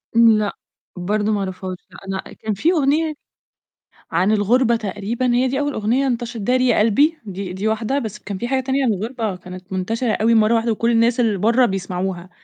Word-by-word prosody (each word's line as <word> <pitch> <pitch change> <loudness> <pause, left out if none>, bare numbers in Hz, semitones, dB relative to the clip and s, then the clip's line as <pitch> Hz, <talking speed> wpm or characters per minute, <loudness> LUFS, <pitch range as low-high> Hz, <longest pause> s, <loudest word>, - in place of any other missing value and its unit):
لأ، 220 -3 +4 0.4
برضه 205 +4 -1
ما 205 - +1
اعرفهاش 185 -1 -4
لأ. - - -14
أنا 190 0 -5
كان 215 -1 -4
في 310 - +2
أغنية 310 0 +1 1.0
عن 190 +4 +2
الغُربة 235 +3 +3
تقريبًا 225 +4 -2
هي 255 +2 +2
دي 270 +2 -1
أول 290 0 -1
أغنية 245 +5 +1
انتشرت، 235 -3 -3
داري 255 +4 +2
يا 240 - +3
قلبي، 280 +10 +3
دي 195 -2 -6
دي 195 +4 -2
واحدة 220 +5 0
بس 220 -6 -5
كان 200 -2 -6
في 240 - -3
حاجة 265 0 +1
تانية 270 +1 0
عن 230 - +3
الغُربة 220 0 -3
كانت 180 +1 -11
منتشرة 220 +5 -1
أوي 225 +2 +2
مرّة 220 +1 +4
واحدة 230 0 +1
وكل 230 +2 0
الناس 235 +1 +3
اللي 215 -5 +1
برّه 235 +5 +4
بيسمعوها، 185 -2 -3
220 Hz, 195 wpm, -20 LUFS, 195-245 Hz, 1.0 s, لأ